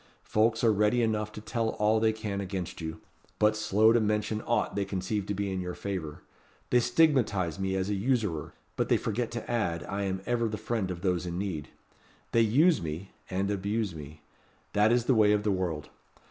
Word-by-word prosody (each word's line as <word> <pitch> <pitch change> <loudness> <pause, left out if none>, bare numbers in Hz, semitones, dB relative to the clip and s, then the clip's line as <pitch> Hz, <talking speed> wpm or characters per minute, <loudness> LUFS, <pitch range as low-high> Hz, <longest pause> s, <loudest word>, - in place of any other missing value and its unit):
Folks 110 +2 +1
are 115 -2 +5
ready 105 +4 +2
enough 105 -1 0
to 105 - -8
tell 115 +1 -1
all 105 +1 +3
they 110 0 +3
can 105 -2 -4
against 95 -3 -5
you; 80 0 -5 0.4
but 105 0 +3
slow 110 +1 +4
to 120 - +4
mention 105 0 0
aught 120 - +1
they 100 - +1
conceive 95 +1 -3
to 100 - -2
be 100 0 -2
in 95 -1 -2
your 90 0 -4
favour. 90 -7 -5 0.5
They 125 - +6
stigmatize 120 - +2
me 95 0 -1
as 95 0 0
a 105 - 0
usurer; 100 - -1 0.2
but - - -1
they - - +5
forget 115 +2 -2
to 115 -1 -6
add, 85 -10 -1
I 100 +4 -3
am 95 0 -2
ever 120 -1 +1
the 110 0 -3
friend 110 -2 -2
of 90 -1 -5
those 90 -2 0
in 85 0 -3
need. 90 -6 -3 0.6
They 115 - +4
use 150 +10 +4
me, 80 +4 -5 0.2
and 95 +2 -1
abuse 100 0 -1
me. 75 -1 -10 0.5
That 105 +2 +4
is 120 -1 +2
the 130 - +4
way 105 -2 +5
of 105 0 +1
the 105 - +1
world. 85 -6 -2
105 Hz, 205 wpm, -29 LUFS, 95-110 Hz, 0.6 s, They